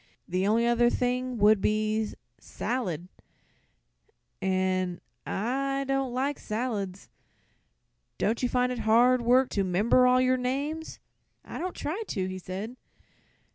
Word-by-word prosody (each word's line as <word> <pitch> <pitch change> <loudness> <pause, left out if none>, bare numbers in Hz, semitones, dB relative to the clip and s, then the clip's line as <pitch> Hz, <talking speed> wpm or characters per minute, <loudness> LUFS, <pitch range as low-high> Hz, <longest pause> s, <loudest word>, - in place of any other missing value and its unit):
"The 185 +2 0
only 230 +3 +3
other 240 0 +4
thing 250 0 -1
would 210 -1 +5
be 215 +1 0 0.3
'Salad,' 185 - -3 1.3
an' 185 -1 0 0.3
I 275 +6 -1
don't 270 -1 0
like 270 +3 -1
salads. 210 -4 -4 1.1
Don't 225 +2 0
you 250 - +1
find 250 0 +1
it 250 - -4
hard 240 +3 +4
work 250 +2 +4
to 200 - 0
'member 210 +7 +3
all 250 0 +5
of 255 - +3
your 255 0 +3
name?" 280 +5 -2 0.6
"I - - -7
don't 365 +1 -4
try 335 +9 -3
to," 190 -4 -2
he 185 0 -5
said. 195 +7 -6
235 Hz, 135 wpm, -28 LUFS, 200-255 Hz, 1.3 s, would